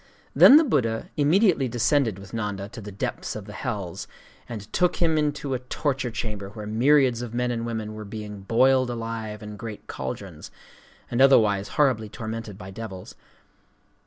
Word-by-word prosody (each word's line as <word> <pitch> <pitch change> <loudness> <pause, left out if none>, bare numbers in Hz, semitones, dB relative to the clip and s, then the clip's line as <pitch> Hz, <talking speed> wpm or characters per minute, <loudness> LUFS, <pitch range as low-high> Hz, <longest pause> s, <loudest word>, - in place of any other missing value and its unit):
Sâkyamuni. - - -9
"Then 275 - +10
the 320 - +6
Buddha 115 - 0
immediately 160 - +3
descended 120 -2 +1
with 100 -1 -12
Nanda 105 -3 -3
to 115 +1 -9
the 105 0 -8
depths 100 - -4
of 105 -2 -6
the 105 - -10
hells, 100 -9 -4 0.4
and 110 -3 -8
took 180 -1 +2
him 165 -2 +2
into 145 -2 -1
a 130 - -1
torture 130 +1 -2
chamber 105 -4 -5
where 105 0 -8
myriads 125 +2 +3
of 120 -1 -6
men 125 0 0
and 115 -1 -3
women 110 -2 -4
were 110 0 -7
being 105 -1 -7
boiled 130 +5 +3
alive 115 -2 -5
in 105 0 -8
great 110 -1 -8
caldrons, 65 -1 -6 0.6
and 120 - +1
otherwise 105 -7 +5
horribly 130 -8 +2
tormented 110 -2 -6
by 95 0 -9
devils. 95 -3 -8
115 Hz, 170 wpm, -25 LUFS, 105-130 Hz, 0.6 s, Then